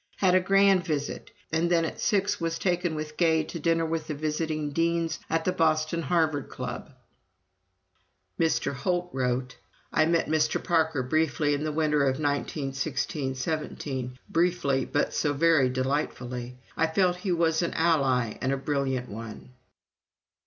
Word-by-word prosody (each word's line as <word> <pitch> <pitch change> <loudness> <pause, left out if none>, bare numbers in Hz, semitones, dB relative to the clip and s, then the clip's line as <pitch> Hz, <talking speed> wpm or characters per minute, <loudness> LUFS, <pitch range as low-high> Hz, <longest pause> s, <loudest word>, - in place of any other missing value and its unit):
Had 185 -2 +3
a 185 - +6
grand 195 0 +4
visit, 150 -5 -3 0.2
and 165 +2 +1
then 170 -2 +3
at - - -5
six 205 -1 +1
was 165 0 -1
taken 175 -3 0
with 155 0 -6
Gay 160 -2 +3
to 165 - -7
dinner 165 +1 +1
with 160 -1 -2
the 155 - -3
visiting 155 0 -2
Deans 165 +1 0
at 165 0 0
the 185 - +2
Boston 160 -1 +1
Harvard 155 -2 0
Club." 125 +3 -6 1.5
(Mr. 165 -3 +1
Holt 175 +6 -1
wrote: 125 -1 -1 0.4
"I 155 - +4
met 165 0 +2
Mr. 155 0 +1
Parker 160 -5 +1
briefly 150 +2 +1
in 145 +1 -1
the 155 - -1
winter 150 -1 +1
of 135 -1 +2
1916 140 -1 -2
17, 130 -3 -4
briefly, 165 -6 +1
but 145 - 0
so 145 - +1
very 155 -3 +4
delightfully! 125 -2 -3 0.2
I 160 - +2
felt 180 +2 +2
that - - -14
he 190 - -1
was 165 -1 +2
an 170 - -2
ally 135 -9 +2
and 130 - 0
a 135 - 0
brilliant 135 -2 -1
one.") 110 +3 -9
155 Hz, 155 wpm, -27 LUFS, 135-165 Hz, 1.5 s, a